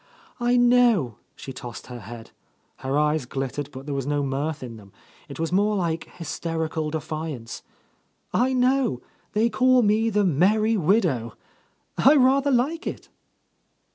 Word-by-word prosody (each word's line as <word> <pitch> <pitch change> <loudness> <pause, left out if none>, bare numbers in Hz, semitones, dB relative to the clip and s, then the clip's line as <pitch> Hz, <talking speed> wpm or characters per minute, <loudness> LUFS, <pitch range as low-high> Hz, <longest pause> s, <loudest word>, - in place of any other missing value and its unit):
"I 245 +1 +2
know 240 - +4
I" - - -38
She 135 - -8
tossed 120 -2 -8
her 125 -1 -8
head. 115 +1 -10 0.5
Her 135 +2 -2
eyes 150 -3 +1
glittered, 135 +2 -4
but 135 0 -9
there 145 - -4
was 135 -1 -3
no 145 0 0
mirth 145 +2 -2
in 115 -2 -8
them, 100 -2 -15 0.2
— - - -28
it - - -9
was 165 0 -1
more 205 +3 +2
like 165 -4 -1
hysterical 160 -1 -4
defiance. 155 -6 -5 0.7
"I 255 +2 +2
know; 255 - +1 0.3
they 220 +2 +3
call 255 +1 +3
me 215 +2 +2
the 210 -2 +2
Merry 210 +7 +3
Widow. 160 - +1 0.6
I 280 +3 +6
rather 275 +1 +4
like 280 +7 0
it!" - - -6
165 Hz, 155 wpm, -24 LUFS, -, 0.7 s, I